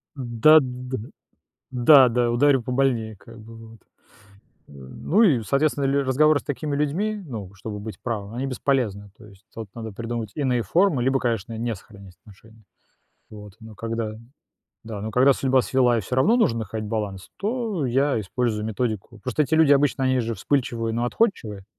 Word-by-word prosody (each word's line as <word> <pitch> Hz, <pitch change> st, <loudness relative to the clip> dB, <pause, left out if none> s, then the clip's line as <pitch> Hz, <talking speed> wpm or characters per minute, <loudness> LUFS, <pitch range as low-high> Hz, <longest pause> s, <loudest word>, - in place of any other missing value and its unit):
Да 130 Hz, +4 st, +5 dB
да 125 Hz, -1 st, -5 dB, 0.7 s
да 130 Hz, +1 st, +6 dB
да 120 Hz, 0 st, +1 dB
ударю 135 Hz, +1 st, +3 dB
побольнее, 125 Hz, -4 st, -1 dB
как 115 Hz, +4 st, -15 dB
бы 115 Hz, +1 st, -13 dB
вот. 115 Hz, 0 st, -13 dB, 0.9 s
Э, -, -, -18 dB
ну 65 Hz, -, -1 dB
и, 140 Hz, -, +4 dB
соответственно, 140 Hz, +3 st, 0 dB
ли 140 Hz, +1 st, +2 dB
разговоры 145 Hz, +3 st, +3 dB
с -, -, -16 dB
такими 145 Hz, +1 st, -3 dB
людьми, 190 Hz, +9 st, -1 dB
ну, 105 Hz, -, -7 dB
чтобы 105 Hz, +1 st, -7 dB
быть 110 Hz, +1 st, -8 dB
правыми, 110 Hz, -2 st, -4 dB
они 135 Hz, -, -2 dB
бесполезны. 120 Hz, -6 st, -1 dB
То 110 Hz, -, -15 dB
есть 100 Hz, 0 st, -19 dB
тут 110 Hz, -3 st, -8 dB
надо 110 Hz, -2 st, -6 dB
придумать 115 Hz, 0 st, -5 dB
иные 130 Hz, -5 st, 0 dB
формы, 170 Hz, -, +2 dB
либо, 135 Hz, +1 st, +2 dB
конечно, 115 Hz, -2 st, -2 dB
не 115 Hz, 0 st, -2 dB
сохранять 100 Hz, -2 st, -15 dB
отношения. 110 Hz, +2 st, -19 dB, 0.7 s
Вот. 105 Hz, -2 st, -11 dB
Но 110 Hz, -1 st, -12 dB
когда 115 Hz, 0 st, -4 dB, 0.7 s
да, 110 Hz, -2 st, -6 dB
но 110 Hz, +2 st, -4 dB
когда 130 Hz, +5 st, +5 dB
судьба 130 Hz, -1 st, +2 dB
свела 125 Hz, -2 st, +2 dB
и -, -, 0 dB
всё 110 Hz, -, -4 dB
равно 215 Hz, -, +4 dB
нужно 115 Hz, -, +2 dB
находить 110 Hz, 0 st, -5 dB
баланс, 105 Hz, -4 st, -4 dB
то 210 Hz, -, -2 dB
я 135 Hz, 0 st, +1 dB
использую 110 Hz, +1 st, -2 dB
методику. 110 Hz, 0 st, -3 dB
Просто 130 Hz, +7 st, 0 dB
эти 155 Hz, +2 st, 0 dB
люди 160 Hz, -3 st, +5 dB
обычно, 140 Hz, -1 st, +2 dB
они 130 Hz, -1 st, +2 dB
же 115 Hz, -1 st, -3 dB
вспыльчивые, 115 Hz, 0 st, -1 dB
но 120 Hz, +2 st, -1 dB
отходчивые. 115 Hz, -, -1 dB
120 Hz, 175 wpm, -23 LUFS, 110-135 Hz, 0.9 s, да